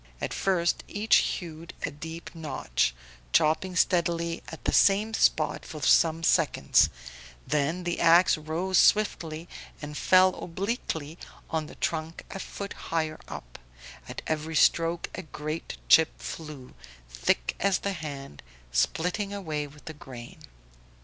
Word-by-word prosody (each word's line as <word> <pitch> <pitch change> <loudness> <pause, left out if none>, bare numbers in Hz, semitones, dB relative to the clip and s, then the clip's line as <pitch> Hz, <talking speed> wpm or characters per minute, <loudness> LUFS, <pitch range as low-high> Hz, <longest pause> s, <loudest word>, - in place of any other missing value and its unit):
At - - -3
first 175 -3 +1
each 210 +2 +3
hewed 165 -2 -3
a - - -4
deep 160 +3 -8
notch, 150 - -1 0.4
chopping 170 +4 +2
steadily 170 -1 +1
at 160 - -10
the - - +2
same 205 +3 +4
spot 155 -8 +2
for 155 -3 -8
some 165 +4 +4
seconds, - - +4 0.6
then 150 +5 0
the 175 0 -2
ax 170 +2 +6
rose 165 +5 0
swiftly 170 -6 +2 0.3
and 150 0 -7
fell 185 +3 +5
obliquely 170 -4 -3 0.3
on 160 -2 -1
the - - -12
trunk 160 0 -3
a 195 - -5
foot 200 +1 -6 0.2
higher 160 -1 -1
up; - - -9 0.5
at - - -6
every 160 +1 -2
stroke 165 +2 +3
a - - -5
great 155 -1 -6
chip 160 0 +5
flew, 150 -5 -8 0.3
thick - - 0
as 195 -1 +2
the 200 - -2
hand, 140 - -7 0.3
splitting 180 - 0
away 155 -7 -3
with 145 +1 -17
the 160 - -6
grain. 125 -5 -11
165 Hz, 135 wpm, -28 LUFS, 155-180 Hz, 0.6 s, ax